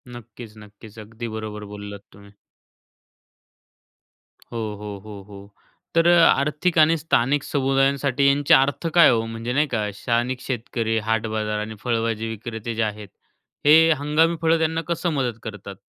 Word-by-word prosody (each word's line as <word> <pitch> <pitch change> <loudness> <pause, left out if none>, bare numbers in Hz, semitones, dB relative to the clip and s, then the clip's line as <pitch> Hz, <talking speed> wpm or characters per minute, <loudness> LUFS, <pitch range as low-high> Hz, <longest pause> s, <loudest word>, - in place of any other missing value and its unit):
नक्कीच 120 -1 -12
,नक्कीच 105 +1 -15
अगदी 115 +2 -8
बरोबर 105 -1 -6
बोललात 100 -1 -8
तुम्ही. 100 +1 -17 2.2
हो, 120 - -5 0.2
हो, 105 -1 -6
हो, 105 -2 -9
हो. 100 0 -13 0.4
तर 165 0 +4 0.2
आर्थिक 150 +4 +2
आणि 160 +2 +5
स्थानिक 145 -2 +1
समुदायांसाठी 135 0 +1
यांचे 140 +1 +3
अर्थ 140 +5 +3
काय 170 - +7
आहे - - +4
हो? 115 0 -1
म्हणजे 115 +2 -5
नाही 150 +3 +2
का 110 -5 -2
स्थानिक 120 +1 -1
शेतकरी, 115 -2 -3
हाट 115 +1 -1
बाजार 105 -1 -2
आणि 110 +1 -5
फळभाजी 115 -2 -1
विक्रेते 110 0 -6
जे 115 - 0
आहेत, 105 -1 -4 0.6
हे 160 +2 +6
हंगामी 155 +3 +2
फळं 165 0 +3
त्यांना 160 0 0
कसं 170 +1 -1
मदत 125 -5 -2
करतात? 100 -2 -8
115 Hz, 145 wpm, -22 LUFS, 110-140 Hz, 2.2 s, काय